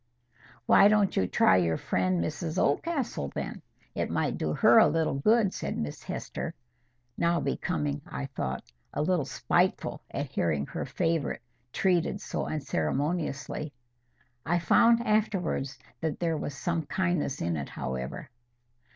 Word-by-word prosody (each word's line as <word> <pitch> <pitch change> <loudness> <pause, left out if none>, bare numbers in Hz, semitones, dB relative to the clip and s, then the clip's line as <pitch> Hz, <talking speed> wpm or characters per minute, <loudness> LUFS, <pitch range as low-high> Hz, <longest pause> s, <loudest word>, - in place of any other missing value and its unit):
"Why 200 - +7
don't 205 -2 +3
you 95 - +2
try 95 - +4
your 85 -3 +2
friend 90 -2 0
Mrs 160 - -3
Oldcastle, 225 - 0
then? - - -4 0.3
It - - -2
might - - 0
do 75 - -1
her - - +6
a - - +7
little 160 -3 +1
good," 205 +8 +3
said - - -3
Miss 75 - -4
Hester, - - -5 0.6
now 170 0 +2
becoming, 150 -4 -1
I 140 - -4
thought, 70 - -4 0.3
a 150 - +1
little 170 -3 +1
spiteful 180 +6 0
at 140 - -3
hearing 80 - -1
her - - -5
favourite 165 -7 -1 0.3
treated 180 +3 +1
so - - -3
unceremoniously. 145 - -2 0.7
I 175 +3 +1
found 230 +7 +4
afterwards 195 - 0 0.2
that 160 -2 -2
there 165 -2 0
was 145 -2 -4
some 165 -2 -2
kindness 175 -7 0
in 85 0 -1
it, 70 -3 -4
however. 65 0 -5
155 Hz, 140 wpm, -29 LUFS, 125-180 Hz, 0.7 s, Why